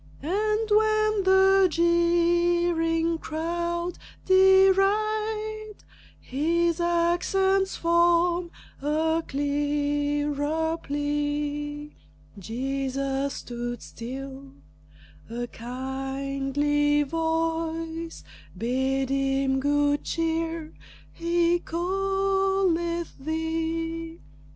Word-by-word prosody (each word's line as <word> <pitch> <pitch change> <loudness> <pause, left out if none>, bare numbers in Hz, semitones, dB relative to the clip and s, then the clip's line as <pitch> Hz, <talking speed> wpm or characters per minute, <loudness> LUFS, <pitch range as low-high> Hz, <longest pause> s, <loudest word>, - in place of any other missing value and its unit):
And 425 +6 0
when 430 -1 +3
the 385 0 +5
jeering 340 -1 +2
crowd 340 +2 -3 0.3
deride, 425 +3 +3 0.4
His 335 +5 0
accents 350 +3 +1
form 340 +1 +2 0.3
a 320 +3 +1
clearer 290 +2 -1
plea. 290 0 -3 0.5
Jesus 270 +4 -2
stood 240 0 -5
still. 270 +3 -8 0.8
A 240 +1 -3
kindly 275 +4 -1
voice 325 +1 -2 0.3
Bade 265 +2 0
him 270 0 +1
good 290 +1 +1
cheer 330 -1 -2 0.4
"He 340 +1 +1
calleth 385 -1 0
thee." 325 +2 -3
325 Hz, 60 wpm, -26 LUFS, 290-345 Hz, 0.8 s, the